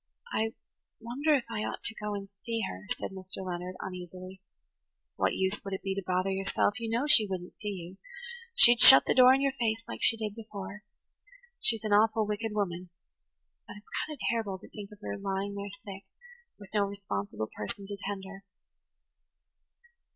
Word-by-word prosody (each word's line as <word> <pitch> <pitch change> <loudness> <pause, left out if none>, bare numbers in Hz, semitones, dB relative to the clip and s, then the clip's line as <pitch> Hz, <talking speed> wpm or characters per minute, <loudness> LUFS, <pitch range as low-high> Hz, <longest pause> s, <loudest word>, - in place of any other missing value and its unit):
"I 225 +3 0 0.4
wonder 275 +7 +1
if 265 - 0
I 225 -2 -3
ought - - -5
to 220 - +1
go 210 -1 -4
and 200 -1 -6 0.2
see 230 -1 -2
her," 95 +2 -8
said - - -4
Mr. 190 0 -7
Leonard 180 0 -5
uneasily. 185 +1 -8 0.7
"What - - +1
use 190 +2 -1
would 195 -1 -3
it - - -8
be 195 -1 -1
to 195 - -3
bother 185 +1 0
yourself? 195 +4 0
You 230 -1 -4
know 235 +5 0
she 230 -8 +8
wouldn't 180 -2 -6
see 210 - -5
you–she'd 470 - +1
shut 135 - +11
the - - +2
door 255 0 +8
in 270 - 0
your 275 -1 +2
face 225 -1 0
like - - -7
she 225 - +6
did 215 -2 -3
before. 210 -2 -8 0.8
She's 225 -2 +3
an 215 -1 0
awful 215 +1 +4
wicked 210 +1 -3
woman–but 180 -3 -7
it's 205 - -17 0.2
kind 305 - -6
of - - -24
terrible 220 -5 -1
to - - -15
think 205 -2 -9
of 210 - -12
her - - -4
lying 195 0 -2
there 200 0 -5
sick, 195 0 -10 0.5
with 200 -1 -14
no 205 -1 +3
responsible 110 - -4
person 150 - -6
to 200 +1 -5
tend 200 0 -5
her." 195 0 -10
205 Hz, 180 wpm, -30 LUFS, 190-225 Hz, 0.8 s, shut